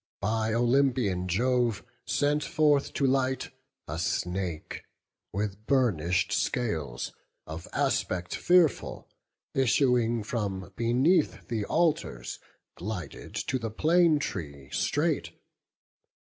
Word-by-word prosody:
by 110 +2 0
Olympian 120 -6 +2
Jove 120 +3 +1 0.2
Sent 145 +1 +1
forth 150 -4 +2
to 140 - +1
light, 130 0 +1 0.4
a - - -4
snake, 90 -3 -2 0.5
with 100 +1 -3
burnish'd 95 - +2
scales, 80 - -1 0.3
Of 80 +2 -7
aspect 90 0 0
fearful, 175 -4 +2 0.5
issuing 120 -3 +2
from 100 -4 -3
beneath 130 - +2
The 110 -4 -1
altars, 150 - 0 0.4
glided 90 -2 -6
to 130 - -1
the 115 -1 -3
plane 160 +7 +4
tree 70 - -5
straight. 145 - 0
115 Hz, 95 wpm, -28 LUFS, 95-135 Hz, 0.5 s, plane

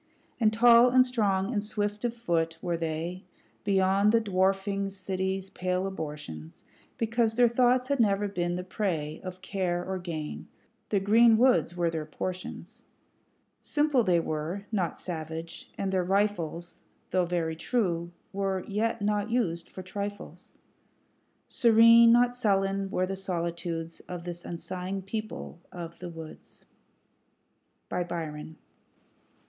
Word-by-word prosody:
And 220 -3 +4
tall, 235 +2 +7
and 255 +1 +5
strong, 205 -4 0
and 205 -2 0
swift 210 0 -2
of 235 -1 -1
foot 165 -7 -1
were 175 -1 -2
they, 165 +3 -3 0.4
Beyond 195 +1 +3
the 230 - +5
dwarfing 195 0 0
city's 190 0 -3
pale 185 +1 -1
abortions, 145 - -7 0.3
Because 230 0 +1
their 245 0 +6
thoughts 250 +1 +3
had 280 -1 0
never 205 -2 +3
been 175 -3 -2
the 180 - -3
prey 170 -6 -3
Of 185 0 -8
care 180 -2 -1
or 190 0 -3
gain; 160 -4 -5 0.4
the 205 - +2
green 220 +3 +5
woods 245 -8 +3
were 170 -1 +1
their 160 -2 -4
portions 185 +4 -6 0.8
Simple 295 -4 +2
they 180 -4 +3
were, 165 +5 -3
not 190 -6 -1
savage; 165 -1 -6
and 195 -1 -1
their 185 -1 +1
rifles, 175 -3 -1 0.3
Though 185 -1 +2
very 170 -2 -1
true, 170 -4 -1 0.2
were 195 -1 -1
yet 215 +1 -1
not 210 +1 0
used 185 -9 -1
for 185 - -9
trifles. 200 +2 -7 0.9
Serene, 230 0 +7
not 245 +1 +4
sullen, 195 -4 +1
were 185 -1 0
the 195 +1 -3
solitudes 170 -3 -3
Of 175 -1 -5
this 175 0 -6
unsighing 185 +3 -4
people 215 -2 -6
of 170 -1 -8
the 180 - -6
woods. 160 -2 -11 1.2
Byron. 160 -3 -4
190 Hz, 130 wpm, -28 LUFS, 170-215 Hz, 1.2 s, tall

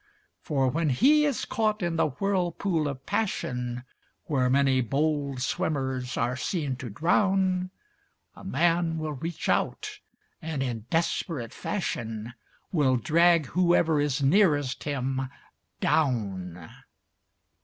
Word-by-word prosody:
For 135 -3 0
when 155 +4 +1
he 290 - +4
is 280 -7 -1
caught 215 -3 0
in 170 -1 0
the 160 -1 +3
whirlpool 175 0 -1
of 135 -2 -6
passion, 125 - -2 0.4
Where 130 -4 +1
many 135 -1 +3
bold 140 +1 -1
swimmers 130 -3 -2
are 120 +2 0
seen 140 0 -2
to 125 -2 -6
drown, 185 - +1 0.7
A - - -13
man 170 0 +1
will 155 -1 -3
reach 165 +4 -5
out - - -1 0.4
and, 155 -4 -2
in 115 -3 -4
desperate 160 -6 -1
fashion, 115 - -4 0.4
Will 140 -7 +3
drag 165 +5 +4
whoever 170 -1 +2
is 145 -1 0
nearest 145 -5 +3
him 135 -2 -2 0.5
down. 95 - -1
145 Hz, 115 wpm, -27 LUFS, 130-175 Hz, 0.7 s, he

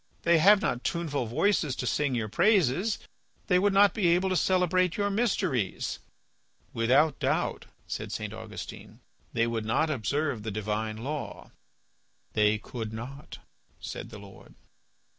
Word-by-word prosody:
"They 170 -1 +4
have 200 +5 +6
not 120 - -1
tuneful 145 -7 -2
voices 150 - +1
to 125 - -4
sing 140 +1 0
your 115 -2 -1
praises. 190 - +2 0.5
They 180 -1 +3
would 205 +2 +3
not 200 +1 +5
be 205 -6 +1
able 180 +3 +3
to 185 - 0
celebrate 185 -1 +2
your 205 -1 0
mysteries." 195 - -1 0.7
"Without 135 +6 +3
doubt," - - -1 0.2
said - - -5
St. 105 -1 -4
Augustine, 110 -1 -9 0.3
"they 115 - +2
would 115 -1 -2
not 135 +9 +1
observe 140 0 -1
the 110 - -4
divine 110 +1 -3
law." 140 +6 -6 0.8
"They 105 0 +3
could 110 0 -6
not," 135 +6 -8 0.4
said - - -7
the 110 - -9
Lord. 100 -1 -14
140 Hz, 140 wpm, -28 LUFS, 110-180 Hz, 0.8 s, have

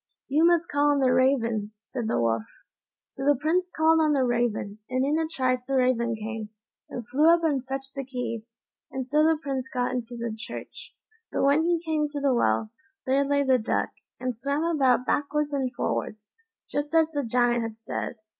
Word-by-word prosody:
"You 310 +5 +4
must 345 -1 +3
call 290 0 +2
on 290 - +3
the 255 -2 +3
raven," 230 -5 +1 0.2
said 240 -4 -3
the - - +1
Wolf. 115 -1 +1 0.6
So 270 - -8
the 290 0 +4
Prince 350 +5 +1
called 320 -1 +3
on 305 -1 +3
the 270 -2 +2
raven, 235 -4 -1
and 255 +1 +1
in 300 +3 +1
a 320 - 0
trice 255 -5 -1
the 275 - 0
raven 245 -3 +2
came, 220 0 -5 0.4
and 240 -2 -6
flew 290 +6 +4
up 340 0 +3
and 285 -5 +1
fetched 270 0 -5
the 275 - -4
keys, 240 -3 -5 0.3
and 260 -1 -4
so 295 +3 +3
the 320 0 +4
Prince 270 -4 -3
got 250 -1 -1
into 245 -1 -4
the 235 -1 -3
church. 225 - -9 0.4
But - - 0
when 285 +4 +4
he 345 -1 +2
came 305 -2 0
to 290 - -2
the 280 -2 +2
well, 110 - +1 0.3
there 270 +2 +3
lay 285 0 +2
the 260 -2 +3
duck, 220 - -1 0.3
and 255 -1 -2
swam 280 +6 -1
about 270 -7 +2
backwards 295 +1 0
and 265 -3 0
forwards, 215 -2 -3 0.4
just 290 +2 -2
as 320 -1 +4
the 290 -2 -1
Giant 240 0 +2
had 225 -1 -5
said. 225 +2 -4
265 Hz, 200 wpm, -26 LUFS, 235-295 Hz, 0.6 s, You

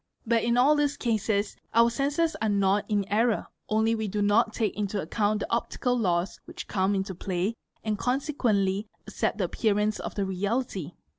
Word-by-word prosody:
But 230 0 +2
in 235 +1 +2
all 275 +5 +5
these 290 -1 +1
cases 215 -3 0 0.2
our 235 +1 +6
senses 290 +6 0
are 220 - +1
not 200 +1 +2
in 205 -2 +1
error; 225 +2 +1 0.2
only 220 +1 +2
we 220 -1 -1
do 205 +1 -1
not 215 +3 +3
take 220 -1 -1
into 205 -1 -2
account 210 +4 0
the - - -4
optical 245 +1 0
laws 180 -5 0
which 345 +1 -8
come 195 0 +1
into 190 0 -2
play 185 +3 -2 0.3
and 215 -2 -1
consequently 230 -7 0 0.2
accept - - -1
the - - 0
appearance 210 -1 0
for - - -2
the 200 - -2
reality. 195 - -2
215 Hz, 175 wpm, -27 LUFS, 200-235 Hz, 0.3 s, our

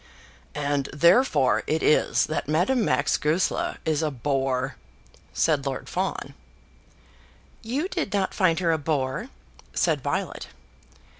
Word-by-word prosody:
"And 145 -1 -1
therefore 170 - +4
it 160 - 0
is 150 - +3
that 155 - -3
Madame 185 - +2
Max - - +1
Goesler 160 +5 0
is 155 -1 +1
a 155 - 0
bore," 135 0 -1 0.6
said 150 -4 +1
Lord 135 -1 -4
Fawn. - - -3 1.3
"You 265 +10 -2
did 345 - -3
not 195 -2 0
find 180 -5 +2
her 170 -2 +2
a 160 - +1
bore?" 145 - -2 0.5
said - - +1
Violet. - - -3
155 Hz, 125 wpm, -25 LUFS, 140-185 Hz, 1.3 s, therefore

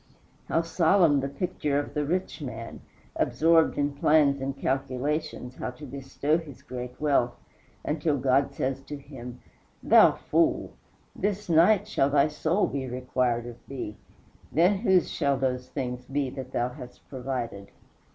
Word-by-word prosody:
How 165 - +1
solemn 165 -2 +4
the 135 +1 -2
picture 150 -1 -2
of 145 - -3
the 150 - 0
rich 180 0 -2
man, 115 -4 -6 0.4
absorbed 165 0 +3
in 145 0 0
plans 140 -1 +3
and 135 0 -3
calculations 135 0 -2
how - - -3
to 150 - -9
bestow 140 +3 -1
his 150 -6 -12
great 125 0 -7
wealth 140 -5 +2 0.5
until 150 -1 0
God 135 +1 +2
says 135 +1 -2
to 145 - -6
him, 130 -3 -10 0.4
"Thou - - +7
fool! - - +1 0.4
this 205 0 -2
night 185 +5 +5
shall 140 -10 +2
thy 145 +1 +3
soul 160 +6 +1
be 135 -2 -3
required 125 -1 -1
of 120 -1 -8
thee 125 -6 -5 0.6
then 180 +5 +3
whose 190 -5 +3
shall 140 -3 +1
those 125 -1 -2
things 125 -3 -4
be 135 0 -2
that 130 -1 -7
thou 120 -1 0
hast 125 0 -12
provided?" 125 -6 -5
140 Hz, 150 wpm, -27 LUFS, 125-155 Hz, 0.6 s, Thou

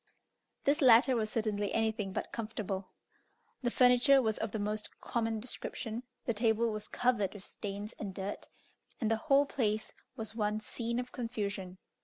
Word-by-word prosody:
This 295 +3 +3
latter 255 0 +7
was 215 -2 0
certainly 215 -2 -1
anything 220 -3 0
but - - -3
comfortable. 210 -4 -3 0.7
The 245 - +1
furniture 250 +3 +6
was 220 -4 +1
of 220 -1 -2
the 220 - -2
most 210 +1 -3
common 225 -2 -1
description, 230 0 -4 0.2
the 235 - +1
table 225 +1 +2
was 215 -1 -5
covered 230 -6 +1
with 200 - -9
stains 205 +1 -6
and 205 -3 -4
dirt, 190 +2 -5 0.5
and 225 -3 +1
the 225 - +3
whole 280 +1 +6
place 215 -6 -1 0.2
was 220 -4 -5
one 210 -1 0
scene 235 +2 -3
of 250 0 -5
confusion. 200 -6 -4
220 Hz, 160 wpm, -33 LUFS, 210-240 Hz, 0.7 s, latter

